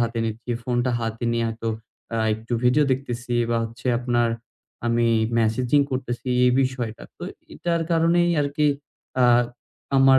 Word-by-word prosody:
হাতে 115 0 0
নিচ্ছি, 115 +2 -4
ফোনটা 120 +1 +1
হাতে 115 +1 -3
নিয়ে 115 0 +1
হয়তো 115 0 -4 0.5
আ 115 - 0 0.2
একটু 115 +2 -8
ভিডিও 135 +5 +5
দেখতেছি 125 -2 -4 0.2
বা, 115 - +2
হচ্ছে 115 +2 -8
আপনার 120 -1 +1 0.6
আমি 115 0 +2 0.3
ম্যাসেজিং 120 +5 +3
করতেসি, 125 -1 -3 0.2
এই 125 - +4
বিষয়টা। 125 -4 -3
তো - - -13 0.3
এইটার 170 -1 -1
কারণেই 170 +1 +3
আরকি 145 +1 +1 0.6
আ - - +6 0.7
আমার 135 0 +7
120 Hz, 140 wpm, -24 LUFS, 115-135 Hz, 0.7 s, আমার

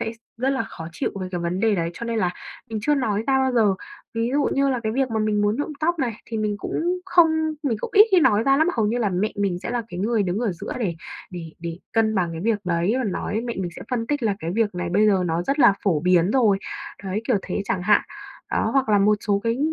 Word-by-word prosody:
sẽ 225 - -2 0.2
rất 255 +3 0
là 270 - 0
khó 165 0 -8
chịu - - -2
về 185 - -4
cái 175 - -2
vấn 170 +2 -2
đề 220 -1 +3
đấy, 170 -3 -1
cho 235 - -6
nên 230 -1 -1
là 180 -4 +1 0.4
mình 220 - -2
chưa 295 +5 +3
nói 220 -6 0
ra 270 -1 +3
bao 265 -1 +1
giờ. 215 -5 +3 0.4
Ví 230 +1 0
dụ 285 0 +2
như 275 0 +2
là 255 -3 0
cái 220 -1 -1
việc 265 0 0
mà 220 - 0
mình 215 -1 +1
muốn 205 +2 +1
nhuộm 290 +2 -3
tóc 340 +1 +1
này 245 -5 0
thì 230 - -4
mình 210 -1 -1
cũng 350 - -1
không 350 -3 +5 0.3
mình 245 -6 0
cũng - - -4
ít 420 +2 +9
khi 370 -3 +5
nói 215 -6 +4
ra 275 +1 +4
lắm, 315 - +3
hầu 220 - +2
như 235 +4 0
là 215 -4 +1
mẹ 190 +4 0
mình 195 -3 0
sẽ - - -4
là 245 -1 -1
cái 180 -3 -6
người 220 +1 +1
đứng 185 +1 -1
ở 230 -4 0
giữa 170 - -6
để 190 -7 -1 0.4
để 165 -3 -7
để 170 0 -5 0.2
cân 225 -1 +2
bằng 175 -4 0
cái 165 - -5
việc 225 -1 +1
đấy 175 +4 +1
và 260 - -1
nói, 205 0 -3
mẹ 235 0 -4
mình 180 -2 -2
sẽ - - -7
phân 230 -2 -1
tích 290 -2 -1
là 210 -3 +1
cái 165 - -3
việc 220 -3 +1
này 180 -1 -3
bây 205 +4 +4
giờ 195 -3 +3
nó 165 +1 0
rất 275 +9 -1
là 205 - +7
phổ 170 -7 +2
biến 180 +1 +3
rồi, 220 -6 +3 0.5
đấy, 195 +3 -2
kiểu 245 - +4
thế 200 +2 -3
chẳng 185 -2 -2
hạn. 210 +3 +4 0.5
Đó, 220 - +1
hoặc 270 -4 +2
là 205 - +5
một 210 +1 +4
số 200 -1 +2
cái, 230 +2 0
215 Hz, 280 wpm, -23 LUFS, 185-245 Hz, 0.5 s, ít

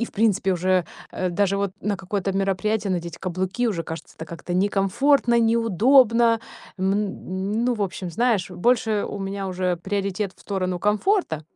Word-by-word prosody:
И - - +1
в - - -12
принципе, 205 -3 +2
уже, 185 0 +1 0.3
э, 185 -1 -2
даже 200 +2 +1
вот 200 -1 -1
на 205 -1 -1
какое-то 195 0 -3
мероприятие 195 +2 0
надеть 170 -2 -4
каблуки 185 +6 -2
уже 175 -6 -2
кажется 160 0 -8
это 160 - -6
как-то 170 +2 -7
некомфортно, 205 +7 +2
неудобно. 230 +1 +4 0.4
Мн 195 +2 -1
ну, 250 0 +2
в 215 - -7
общем, 185 -2 -4
знаешь, 220 -1 +1
больше 220 +3 +1
у - - -5
меня 195 0 -4
уже 180 -1 -1
приоритет 195 +2 -2
в - - -22
сторону 185 -3 -2
комфорта, 210 - +1
195 Hz, 160 wpm, -23 LUFS, 185-220 Hz, 0.4 s, неудобно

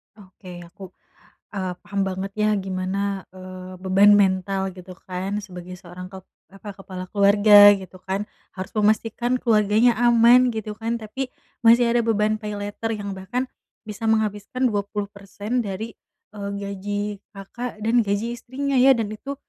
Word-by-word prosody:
Oke 185 -3 -12
aku, 190 +4 -14 0.7
eee, 185 -2 -2
paham 200 0 -3
banget 190 +1 -4
ya 215 0 +1 0.2
gimana, 190 +1 -2
eee, 185 0 -10
beban 195 +2 +5
mental 190 0 +1
gitu 185 0 -11
kan 190 +3 -3
sebagai 180 0 -9
seorang 180 +1 -10
kep 190 -1 -11 0.2
apa, 195 +2 -11
kepala 185 -1 -7
keluarga 205 0 +7
gitu 190 -1 -9
kan, 195 +2 -1 0.3
harus 190 0 -6
memastikan 225 +3 +1
keluarganya 220 +1 +3
aman 240 +1 +5
gitu 215 -1 -5
kan. 230 +1 -2
Tapi 260 +5 -4 0.4
masih 235 +1 +6
ada 240 0 +3
beban 215 -1 +1
paylater 210 +1 -5
yang 200 -1 -5
bahkan 245 +7 -3 0.4
bisa 215 +1 -5
menghabiskan 220 +3 0
20%, 205 +2 -4
dari, 210 +3 -5 0.4
eee, 200 -1 -5
gaji 200 0 -4 0.4
Kakak 215 +3 -7
dan 230 +2 +2
gaji 215 +4 -1
istrinya 270 +2 -2
ya, 265 +1 +7
dan 220 -3 -2
itu, 275 +6 -6
205 Hz, 140 wpm, -23 LUFS, 190-225 Hz, 0.7 s, keluarga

